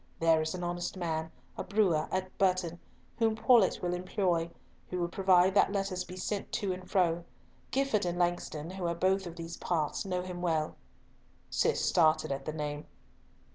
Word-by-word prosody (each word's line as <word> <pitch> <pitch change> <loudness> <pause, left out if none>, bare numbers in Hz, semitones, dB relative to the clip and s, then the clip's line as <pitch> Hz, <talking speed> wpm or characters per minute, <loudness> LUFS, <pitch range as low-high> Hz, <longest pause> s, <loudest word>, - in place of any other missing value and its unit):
There 165 -1 +4
is 160 +3 -2
an 180 - -5
honest 175 +2 -3
man, 160 -2 -2 0.3
a - - -1
brewer, 190 -7 +2
at 185 0 -2
Burton, 180 -3 +1 0.4
whom 225 -1 +3
Paulett 220 -4 +4
will 175 0 0
employ, 180 -2 0 0.4
who 180 - -3
will 175 - +1
provide 185 0 +4
that 200 - +4
letters 195 -2 -1
be 180 - -9
sent 200 +2 -3
to 195 -3 0
and 185 0 -9
fro. 175 -3 +2 0.5
Gifford 265 -8 +1
and 175 0 -2
Langston, 175 -2 -1
who 185 -2 -3
are 170 - -1
both 190 +2 +1
of 170 - -8
these 165 0 -7
parts, 155 -4 -1
know 180 -2 -2
him 180 -1 -6
well." 160 -3 0 0.8
Cis - - +1
started 155 -4 +3
at 135 0 -3
the 155 - -2
name. 150 -1 -4
180 Hz, 175 wpm, -31 LUFS, 165-190 Hz, 0.8 s, There